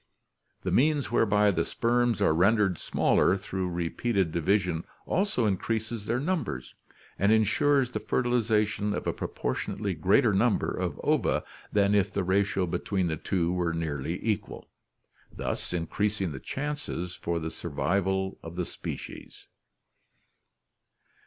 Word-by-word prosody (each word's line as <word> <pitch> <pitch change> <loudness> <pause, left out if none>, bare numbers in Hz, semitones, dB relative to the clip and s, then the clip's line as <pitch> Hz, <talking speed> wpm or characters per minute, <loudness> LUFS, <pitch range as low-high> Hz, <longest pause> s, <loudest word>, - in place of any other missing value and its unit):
The - - -1
means 145 -2 +2
whereby 105 -3 +4
the 85 -3 +1
sperms 120 +1 +1
are - - +4
ren 95 +8 +4
dered 95 -6 +1
smaller 95 - +2
through 95 -1 -3
repeated 90 +2 0
division 85 0 +1 0.2
also 185 - +1
increases 110 +2 -1
their 120 +2 +1
num 165 +2 0
bers 65 - -6 0.5
and 100 +2 +4
insures 125 +5 +3
the - - -2
fertilization 110 -4 +1
of - - -4
a - - 0
proportionately - - -3
greater - - +3
number - - +2
of - - -3
ova - - +2 0.3
than 100 -1 +3
if 100 -1 +2
the 100 - -1
ratio 95 0 +1
between 90 +1 -1
the 80 - -1
two 85 +1 -1
were 90 -2 0
more 80 - -2
nearly 80 +1 -3
equal, 105 -4 -3 0.6
thus - - -3
increasing 95 +2 -1
the 70 - -6
chances 135 - -4
for 85 0 -2
the 80 0 -3
survival 95 +4 -1
of 80 +1 -9
the 90 -1 -1
species. - - -8
100 Hz, 140 wpm, -28 LUFS, 85-110 Hz, 0.6 s, whereby